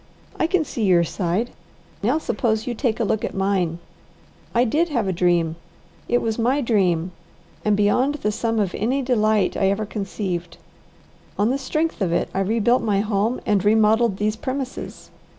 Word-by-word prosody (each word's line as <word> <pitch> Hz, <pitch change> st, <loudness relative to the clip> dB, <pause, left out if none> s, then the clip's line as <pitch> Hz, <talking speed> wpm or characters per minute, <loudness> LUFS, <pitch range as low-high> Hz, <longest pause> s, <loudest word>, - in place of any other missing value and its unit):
I 320 Hz, -, +1 dB
can 345 Hz, -2 st, +1 dB
see 235 Hz, -, -4 dB
your 180 Hz, -4 st, +4 dB
side; 180 Hz, +7 st, -1 dB, 0.5 s
now 245 Hz, +9 st, +2 dB
suppose 230 Hz, -8 st, -1 dB
you 245 Hz, -, -2 dB
take 235 Hz, -1 st, -1 dB
a -, -, +2 dB
look 215 Hz, 0 st, 0 dB
at -, -, -3 dB
mine. 190 Hz, -4 st, 0 dB, 0.8 s
I 240 Hz, -, +5 dB
did 310 Hz, +8 st, +1 dB
have 235 Hz, -9 st, 0 dB
a 190 Hz, -, 0 dB
dream, 170 Hz, -2 st, +1 dB, 0.5 s
it 240 Hz, 0 st, +2 dB
was 225 Hz, 0 st, -1 dB
my 250 Hz, +5 st, +2 dB
dream, 185 Hz, -, +1 dB, 0.5 s
and 210 Hz, -1 st, +2 dB
beyond 250 Hz, +8 st, +2 dB
the 210 Hz, -8 st, -1 dB
sum 225 Hz, +2 st, -1 dB
of 200 Hz, -5 st, 0 dB
any 255 Hz, +6 st, 0 dB
delight 215 Hz, -5 st, +2 dB
I 195 Hz, -, +2 dB
ever 205 Hz, +2 st, -1 dB
conceived. 190 Hz, -4 st, -4 dB, 0.8 s
On 210 Hz, +4 st, +2 dB
the 275 Hz, -, -1 dB
strength 310 Hz, +1 st, -2 dB
of 185 Hz, -3 st, +1 dB
it 170 Hz, -, 0 dB
I 190 Hz, -, -1 dB
rebuilt 225 Hz, +5 st, +2 dB
my 200 Hz, -3 st, +1 dB
home 215 Hz, +3 st, 0 dB
and 205 Hz, -3 st, +2 dB
remodelled 220 Hz, 0 st, +3 dB
these 210 Hz, +1 st, 0 dB
premises. 260 Hz, +2 st, -5 dB
215 Hz, 175 wpm, -22 LUFS, 195-245 Hz, 0.8 s, I